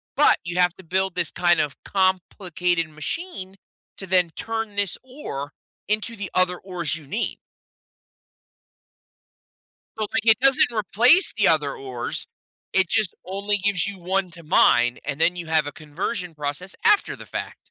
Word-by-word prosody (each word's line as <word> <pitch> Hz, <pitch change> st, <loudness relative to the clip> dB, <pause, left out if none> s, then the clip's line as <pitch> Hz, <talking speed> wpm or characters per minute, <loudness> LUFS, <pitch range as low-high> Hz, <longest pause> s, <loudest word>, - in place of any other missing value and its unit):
but -, -, +5 dB
you 175 Hz, +1 st, -4 dB
have 180 Hz, -1 st, +4 dB
to 190 Hz, -, -15 dB
build 190 Hz, +2 st, 0 dB
this 165 Hz, -, 0 dB
kind 175 Hz, -1 st, +3 dB
of 145 Hz, -1 st, -1 dB
complicated 180 Hz, -3 st, 0 dB
machine 190 Hz, -, -5 dB, 0.4 s
to 195 Hz, -, -8 dB
then 180 Hz, -2 st, +3 dB
turn 225 Hz, -2 st, -4 dB
this 200 Hz, -3 st, 0 dB
ore 145 Hz, -, -6 dB, 0.4 s
into 215 Hz, +2 st, 0 dB
the 200 Hz, -3 st, -6 dB
other 180 Hz, -1 st, +2 dB
ores 175 Hz, -5 st, -3 dB
you 155 Hz, -2 st, -9 dB
need. 215 Hz, +10 st, -2 dB, 2.6 s
So, 215 Hz, -, -1 dB
like, 225 Hz, -1 st, 0 dB
it 225 Hz, -2 st, +6 dB
doesn't 270 Hz, -2 st, +4 dB
replace 235 Hz, -, +4 dB
the 210 Hz, -, +4 dB
other 150 Hz, -4 st, +2 dB
ores 130 Hz, -3 st, -5 dB, 0.4 s
it 190 Hz, -2 st, +3 dB
just 215 Hz, -2 st, 0 dB
only 200 Hz, +2 st, 0 dB
gives 200 Hz, -1 st, +1 dB
you 200 Hz, -1 st, -6 dB
1 185 Hz, +1 st, -1 dB
to 170 Hz, -1 st, -10 dB
mine, 120 Hz, -7 st, +4 dB
and 145 Hz, +1 st, -4 dB
then 180 Hz, +2 st, +3 dB
you 170 Hz, -2 st, -6 dB
have 160 Hz, -2 st, +2 dB
a 145 Hz, -, -4 dB
conversion 170 Hz, +4 st, -5 dB
process 150 Hz, +6 st, -5 dB
after 420 Hz, -2 st, +4 dB
the -, -, -11 dB
fact. -, -, -6 dB
185 Hz, 160 wpm, -23 LUFS, 160-205 Hz, 2.6 s, it